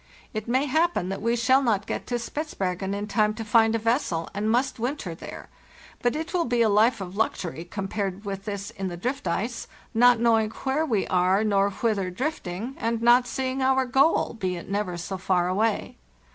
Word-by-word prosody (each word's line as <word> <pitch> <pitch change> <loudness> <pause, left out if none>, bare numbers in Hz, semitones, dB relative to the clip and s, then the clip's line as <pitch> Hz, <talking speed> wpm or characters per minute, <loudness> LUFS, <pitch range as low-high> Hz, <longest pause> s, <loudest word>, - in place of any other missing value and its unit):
It 215 0 -4
may 260 +4 +2
happen 315 - +1
that 195 +1 -4
we 230 +2 +1
shall 260 +3 +4
not 215 -6 +1
get - - -4
to 245 - -1
Spitzbergen 200 - -3
in 205 +1 -3
time 215 0 +1
to 225 0 -5
find 225 +1 +4
a - - +3
vessel, 225 - 0
and 205 +2 -1
must 245 +2 +1
winter 240 - -3
there, 165 - -9 0.5
but 245 +2 +1
it 320 +3 -4
will 350 -2 +1
be 240 -1 +2
a 220 - +3
life 215 +2 +3
of 185 0 -6
luxury 175 -6 -2
compared 195 +1 -4
with 195 0 -5
this 200 0 -4
in 195 -4 -4
the 175 -1 -5
drift 250 +4 -3
ice, 230 +7 -2 0.3
not 240 +1 +5
knowing 225 -2 +3
where 270 +7 -1
we 215 -7 +1
are 185 +3 +2
nor 200 -2 +2
whither 200 -2 -1
drifting, 235 - -4
and 230 0 -1
not 245 +1 +5
seeing 260 +1 -2
our 265 0 +3
goal, 270 +6 +3
be 185 -5 -2
it 170 - -8
never 195 -3 -2
so 185 +2 -5
far 180 -2 +1
away. 210 +4 0
220 Hz, 200 wpm, -25 LUFS, 195-245 Hz, 0.5 s, not